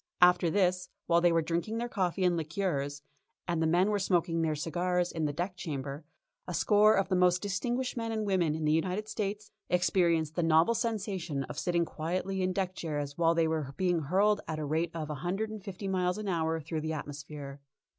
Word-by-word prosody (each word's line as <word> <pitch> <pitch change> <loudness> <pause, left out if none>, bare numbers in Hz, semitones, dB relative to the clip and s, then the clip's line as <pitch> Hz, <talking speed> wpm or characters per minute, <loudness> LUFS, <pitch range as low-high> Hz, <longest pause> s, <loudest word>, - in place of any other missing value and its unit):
After 180 -1 +5
this, 180 0 +1 0.2
while 170 0 +3
they 175 0 +5
were 165 -1 +2
drinking 170 +7 -2
their 240 +1 -2
coffee 190 -4 -1
and 180 -1 +3
liqueurs, 150 -4 -2 0.4
and 170 -2 0
the 160 - +3
men 180 +5 +3
were 205 - +1
smoking 170 -3 +1
their 160 -1 +1
cigars 175 +3 0
in 160 -2 -2
the 150 - 0
deck 175 +5 -3
chamber, 145 -3 -5 0.4
a 180 - -3
score 210 +6 +5
of 195 - +1
the 185 - +2
most 180 0 +4
distinguished 240 +6 -1
men 230 -1 -3
and 220 -1 -1
women 180 -6 +1
in 160 -1 -2
the 150 - +3
United 180 +6 0
States 210 -1 -4 0.2
experienced 170 -3 +2
the 175 - 0
novel 165 +6 +4
sensation 195 - -2
of - - -6
sitting 170 -1 +1
quietly 185 +5 -3
in 185 0 +1
deck 185 0 -1
chairs 145 -5 -4
while 165 0 +3
they 165 -1 +3
were 155 -4 -2
being 180 -2 +2
hurled 195 +7 +2
at 160 - -2
the 155 -1 -3
rate 160 +4 0
of 155 -2 -4
a - - -3
hundred 195 +5 -2
and 215 -3 -7
fifty 195 0 -6
miles 180 -1 0
an 215 -1 -5
hour 165 -3 0
through 155 +1 -4
the 160 +1 -2
atmosphere. 145 -1 -7
175 Hz, 210 wpm, -30 LUFS, 160-195 Hz, 0.4 s, After